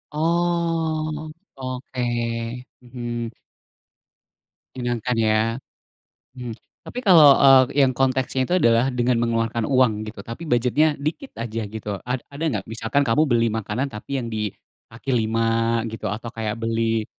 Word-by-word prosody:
Oh 160 -2 0 0.2
oke, 130 -1 -5 0.8
mhm. 120 -2 -5 1.4
Menyenangkan 120 -1 -2
ya, 110 0 +3 1.0
mmm, 120 -3 -6 0.3
tapi 250 - -5
kalau, 160 -7 +9
eee, 135 0 +6
yang 130 - +1
konteksnya 130 0 +1
itu 180 - +3
adalah 115 +1 +4
dengan 125 0 +1
mengeluarkan 115 -1 0
uang 125 -6 +3
gitu 110 - -12
tapi 115 +8 -7
budgetnya 130 +6 +3
dikit 155 - -4
aja 115 -1 -3
gitu 105 -1 -5
ad 125 +1 -2
ada 145 +3 -6 0.2
gak - - -27
misalkan 115 +5 0
kamu 115 +7 +4
beli 115 -1 +3
makanan 110 +4 -2
tapi 135 +6 -4
yang 115 - -5
di 105 -1 -1 0.4
kaki 120 +4 -5
5 115 0 +1
gitu 110 -1 -5
atau 110 +3 -5
kayak 110 -1 -3
beli 115 -1 0
120 Hz, 135 wpm, -23 LUFS, 115-140 Hz, 1.4 s, kalau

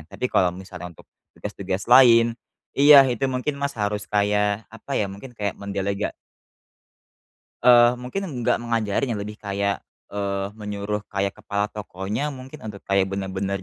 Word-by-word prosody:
tapi 125 - -4
kalau 90 - +4
misalnya 90 0 -8
untuk - - -16 0.3
tugas-tugas 95 0 -4
lain 115 -2 +7 0.4
iya, 140 0 +8
itu 130 +1 0
mungkin, 130 +2 -2
Mas, 140 -1 -2
harus 105 -1 -2
kayak 105 +1 +1
apa, 125 +5 -5
ya, - - +2
mungkin 100 +6 -9
kayak 100 -2 -3
mendelega 100 0 -2 1.5
Eee, 120 0 +7
mungkin 125 +11 -5
enggak 125 -7 0
mengajarin, 115 +1 -1
ya, - - -3
lebih 105 +1 -8
kayak, 100 0 -2 0.2
eee, 100 -1 -2
menyuruh 105 0 -4
kayak 100 0 -1
kepala 100 +1 -2
tokonya 105 +5 -4
mungkin 130 +3 -10
untuk 100 -2 -8
kayak 100 -1 +2
bener-bener 95 0 -3
105 Hz, 145 wpm, -23 LUFS, 100-120 Hz, 1.5 s, iya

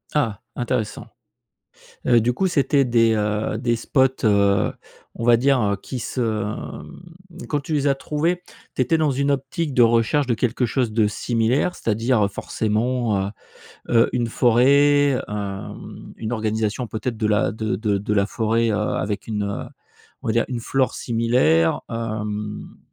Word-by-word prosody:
Ah, 115 -9 0
intéressant. 120 -4 -2 1.0
Heu, 120 -2 +5
du 120 +2 +1
coup 190 +10 0
c'était 140 -5 +2
des, 115 -2 +3
heu, 105 0 -1
des 120 -1 0
spots, 130 +3 +1
heu, 100 -2 +3 0.4
on 115 - -5
va 120 0 +6
dire, 135 +2 +3
heu, 100 -2 +1
qui 125 +6 -7
se 125 +2 -4
mmh, 165 - -6
quand 145 - 0
tu 155 +3 -4
les 145 -1 +1
as 140 - +4
trouvés, 160 +6 -1 0.3
tu - - -3
étais 130 +6 +3
dans 155 -2 +2
une 140 +2 0
optique 140 +2 -2
de 125 - +5
recherche 115 +5 +3
de 125 - +1
quelque 120 +2 0
chose 120 -1 0
de 110 -1 +3
similaire? 115 +9 0
C'est-à-dire, 115 +1 +1
heu, - - +1
forcément, 110 0 -1
heu, - - -4 0.6
heu 115 -1 +4
,une 120 -2 0
forêt, 140 +4 +4
hem, 100 -2 -7
une 110 +1 -4
organisation 110 +1 -1
peut-être 110 +1 -4
de 110 - 0
la 105 -1 +2
de 110 -2 -2
de 105 -1 0
de 105 +2 -2
la 100 -1 +3
forêt, 115 +1 0
heu, - - 0
avec 105 -1 -2
une, 105 -2 -2
heu, 100 0 -3 0.6
on - - -4
va - - +2
dire 115 - +1
une 125 -3 -3
flore 130 +2 0
similaire. 115 -9 +2
Hem, 105 -2 -4
115 Hz, 170 wpm, -22 LUFS, 105-130 Hz, 1.0 s, va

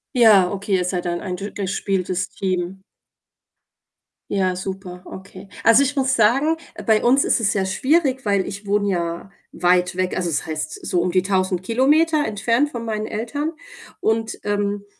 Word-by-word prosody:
Ja, 210 -7 +6
okay, 200 0 -1
ihr 180 -1 0
seid 180 -1 -2
dann 175 0 -2
ein 185 -3 -4
dur 205 +2 -5
durchgespieltes 185 -1 -2
Team. 185 0 -3 1.5
Ja, 185 -2 +1
super, 185 -1 -6
okay. 190 +1 -11
Also, 230 +5 +6
ich 285 +1 -1
muss 265 -1 +1
sagen, 265 +9 +3 0.3
bei 220 -2 +3
uns 265 +3 +4
ist - - +2
es 215 -2 +1
sehr 195 -2 0
schwierig, 265 - +1
weil 200 -2 +1
ich 200 +1 -7
wohne 205 0 +1
ja 170 +1 -3 0.2
weit 180 0 +2
weg, 185 0 -1
also, 180 -2 -1
es 145 - -1
heißt 155 -1 -5
so 175 - +1
um 180 - 0
die 185 0 +2
1.000 185 -2 0
Kilometer 295 - +2
entfernt 230 +6 +1
von 235 -3 -5
meinen 215 -1 -2
Eltern. 285 +9 -3 0.5
Und, 220 0 -1
ähm, 205 0 -1
200 Hz, 170 wpm, -21 LUFS, 185-230 Hz, 1.5 s, Ja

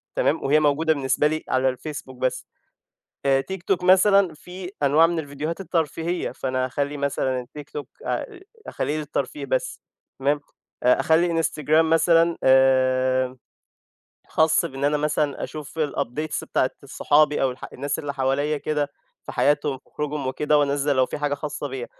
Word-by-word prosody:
تمام، - - +1
وهي 145 +3 +4
موجودة 155 +2 +2
بالنسبة 140 +1 +1
لي 155 +1 -2
على 130 0 +2
الFacebook 145 -1 -7
بس. 130 0 -2 0.8
آآ، 135 -1 +4
TikTok 190 -1 -1
مثلًا، 190 0 +5
فيه 180 +4 -9
أنواع 150 +4 +5
من 170 -1 -1
الفيديوهات 155 +4 -4
الترفيهية، 165 0 -2
فأنا 130 -1 -2
هأخلِّي 145 +3 -2
مثلًا 130 -3 -1
الTikTok 145 0 -7 0.2
آآ، 420 -6 -3 0.3
أخلِّيه 150 - -2
للترفيه 155 - -3
بس، - - -2 0.4
تمام. 145 +2 +1 0.4
آآ، 125 - +4
أخلِّي 165 0 +2
Instagram 155 +1 +2
مثلًا 165 +1 +3
آآ، 130 -1 +3 0.9
خاص 160 +1 +3
بإن 135 -4 -4
أنا 145 +1 +3
مثلًا، 150 -1 -1
أشوف 155 +1 -8
الupdates 150 0 -2
بتاعة - - 0
صحابي، 150 0 +2
أو 135 - +2
الح 125 - -9
الناس 140 +2 -3
اللي 145 -2 -4
حواليَّا 140 +3 0
كده 150 -1 -1 0.4
في - - -6
حياتهم 145 -2 +1
في - - -31
خروجهم 150 -2 -3
وكده، 150 +3 +1
وأنزِّل 145 0 +1
لو 130 0 +4
في - - -5
حاجة 145 -1 0
خاصة 145 0 -5
بيَّا. 130 -3 -5
145 Hz, 150 wpm, -23 LUFS, 135-160 Hz, 0.9 s, مثلًا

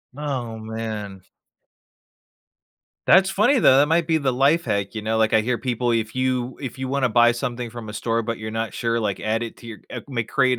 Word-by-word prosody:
Oh, 130 -6 -4
man. 110 -3 -6 1.9
That's 190 0 +6
funny, 235 +8 +3
though. 130 - +6
That 145 +2 +5
might 165 +1 +2
be 160 0 +2
the 135 -4 0
life 145 +7 +3
hack, 100 -1 -1
you 110 - -4
know? 110 +1 -1
Like, 110 0 +2
I 110 - +6
hear 120 +3 0
people, 120 -1 -1
if 110 -2 -1
you 130 -1 -1
if 135 -4 -6
you 130 0 -4
wanna 135 -1 +1
buy 120 +1 +5
something 120 0 -4
from 115 -1 -9
a 105 - -7
store, 115 +2 -1
but 115 +1 -3
you're 110 0 -6
not 115 0 -3
sure, 115 -1 -1
like, 105 -3 -2
add 110 +2 0
it 115 - -7
to - - -15
your, 115 -2 -8
uh, - - -6
ma 120 -3 -1
create 130 0 +2
120 Hz, 220 wpm, -23 LUFS, 110-130 Hz, 1.9 s, That's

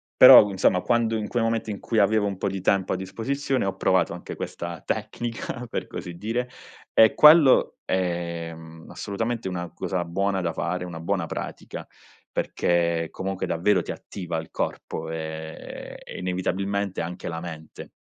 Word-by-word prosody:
però, 105 - +10
insomma, 95 -1 +2
quando 115 -2 +1
in 105 -1 -3
quei 120 -2 0
momenti 115 -1 -1
in 100 - -5
cui 115 -2 0
avevo 105 +1 +3
un 100 -2 -3
po' 100 - -1
di 95 -1 -4
tempo 95 0 +2
a - - 0
disposizione, 130 +6 -2
ho 95 - -2
provato - - +2
anche - - -7
questa 85 -3 -5
tecnica, 120 +1 -4
per - - -4
così 90 - -7
dire, 115 +6 -2 0.4
e 110 -1 +6
quello 150 -3 +7
è, 85 -2 -2
mhmm, 80 0 -12
assolutamente 115 +1 -3
una 90 -1 -4
cosa 90 -2 -2
buona 95 +3 0
da 85 -2 -1
fare, 90 +3 -2
una 85 -2 -7
buona 85 - -1
pratica, - - -6 0.5
perché 85 -1 0
comunque 95 0 -3
davvero 90 +2 +2
ti - - -5
attiva 85 -4 -5
il 80 - -6
corpo, 80 0 -4
ehm, 80 0 -7
e - - -9
inevitabilmente 95 +2 -2
anche 90 +2 -5
la 80 0 -4
mente. 80 -2 -9
95 Hz, 165 wpm, -25 LUFS, 85-110 Hz, 0.5 s, però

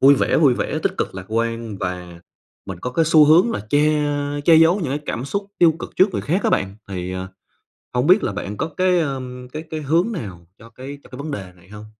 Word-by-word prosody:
vui 140 +1 +7
vẻ, - - +1
vui 140 -6 +4
vẻ - - -2
tích - - +1
cực - - -2
lạc 95 -1 -7
quan 115 -1 -2
và 90 -2 -5 0.5
mình 95 -2 -7
có 125 - -3
cái 165 +6 +2
xu 155 -1 +6
hướng 165 +9 +5
là - - -3
che 145 - +4 0.6
che 165 - +6
giấu 165 +3 +6
những 140 -6 -2
cái 145 - -2
cảm 120 - -3
xúc 200 +8 -3
tiêu 170 -2 +6
cực - - -7
trước 185 - +5
người - - -2
khác 180 +7 0
á - - +3
bạn, 95 +1 0
thì, 90 -1 -4
ờ, 95 0 -5 0.7
hông 125 +3 +1
biết 190 +4 +5
là - - 0
bạn 100 +1 -5
có 160 - -1
cái, 185 -1 +3
ờ, 140 -5 -2 0.3
cái 155 - -5
cái 155 -1 -4
hướng 165 +9 +1
nào 95 - -7
cho 115 - -14
cái 130 +5 -9
cho - - -17
cái 125 - -10
vấn 150 +2 -5
đề 95 -8 -6
này 90 +1 -21
hông? 105 0 -10
130 Hz, 250 wpm, -21 LUFS, 100-160 Hz, 0.7 s, vui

